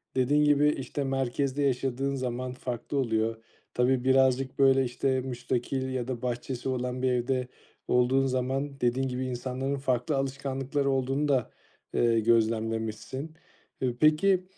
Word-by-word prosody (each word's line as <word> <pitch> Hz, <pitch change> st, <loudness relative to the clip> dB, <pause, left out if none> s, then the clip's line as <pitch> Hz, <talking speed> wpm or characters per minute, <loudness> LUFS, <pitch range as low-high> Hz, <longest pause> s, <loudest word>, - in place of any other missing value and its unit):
Dediğin 145 Hz, +4 st, +3 dB
gibi, 145 Hz, 0 st, +4 dB
işte, 140 Hz, 0 st, -3 dB
merkezde 135 Hz, +1 st, -1 dB
yaşadığın 135 Hz, +1 st, 0 dB
zaman 125 Hz, -1 st, -3 dB
farklı 125 Hz, +2 st, -4 dB
oluyor. 115 Hz, -3 st, 0 dB, 0.3 s
Tabii 125 Hz, 0 st, +2 dB
birazcık 130 Hz, 0 st, +2 dB
böyle, 135 Hz, -1 st, +5 dB
işte, 130 Hz, +2 st, 0 dB
müstakil 130 Hz, +1 st, -2 dB
ya 125 Hz, -2 st, -2 dB
da 125 Hz, -3 st, -4 dB
bahçesi 125 Hz, +1 st, -3 dB
olan 125 Hz, 0 st, -2 dB
bir 130 Hz, 0 st, +2 dB
evde 125 Hz, +1 st, 0 dB, 0.4 s
olduğun 125 Hz, +2 st, +3 dB
zaman, 135 Hz, +2 st, -2 dB
dediğin 125 Hz, +2 st, +1 dB
gibi, 130 Hz, 0 st, -3 dB
insanların 130 Hz, +2 st, -3 dB
farklı 130 Hz, +1 st, 0 dB
alışkanlıkları 135 Hz, +1 st, -1 dB
olduğunu 135 Hz, +2 st, 0 dB
da, 130 Hz, -5 st, +1 dB, 0.4 s
eee, 115 Hz, -1 st, +3 dB
gözlemlemişsin. 115 Hz, +5 st, 0 dB, 0.5 s
E, 125 Hz, -2 st, -1 dB
peki 175 Hz, +6 st, +4 dB
130 Hz, 130 wpm, -28 LUFS, 125-135 Hz, 0.5 s, böyle